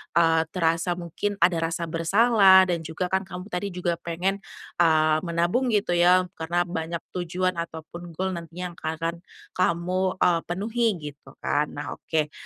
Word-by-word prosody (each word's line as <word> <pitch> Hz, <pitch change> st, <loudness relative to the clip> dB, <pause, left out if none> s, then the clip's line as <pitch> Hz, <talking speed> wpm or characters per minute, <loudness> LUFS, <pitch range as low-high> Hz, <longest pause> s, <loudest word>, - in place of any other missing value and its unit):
eee, 165 Hz, -1 st, +4 dB
terasa 165 Hz, 0 st, +1 dB
mungkin 180 Hz, +4 st, -3 dB
ada 170 Hz, -1 st, +4 dB
rasa 165 Hz, +1 st, -2 dB
bersalah, 190 Hz, +2 st, +5 dB
dan 170 Hz, -, 0 dB
juga, 180 Hz, +3 st, -3 dB
kan, 190 Hz, 0 st, 0 dB
kamu 180 Hz, +2 st, -8 dB
tadi 180 Hz, +3 st, -2 dB
juga 175 Hz, -2 st, -2 dB
pengen, 180 Hz, +4 st, -2 dB, 0.4 s
eee, 155 Hz, -2 st, +4 dB
menabung 175 Hz, +10 st, +1 dB
gitu, 200 Hz, -3 st, 0 dB
ya, 180 Hz, +1 st, +5 dB, 0.2 s
karena 170 Hz, +2 st, 0 dB
banyak 170 Hz, -1 st, -4 dB
tujuan 180 Hz, 0 st, -2 dB
ataupun 170 Hz, +1 st, -7 dB
goal 190 Hz, +3 st, -1 dB
nantinya 175 Hz, +1 st, -6 dB
yang -, -, -16 dB
akan 165 Hz, +2 st, -3 dB, 0.3 s
kamu, 185 Hz, +1 st, 0 dB
eee, 170 Hz, -2 st, +3 dB
penuhi 220 Hz, +7 st, 0 dB, 0.2 s
gitu, 145 Hz, -, -19 dB
kan. 150 Hz, 0 st, +1 dB
Nah 145 Hz, 0 st, -7 dB
oke, 155 Hz, -2 st, -1 dB
175 Hz, 155 wpm, -25 LUFS, 165-185 Hz, 0.4 s, bersalah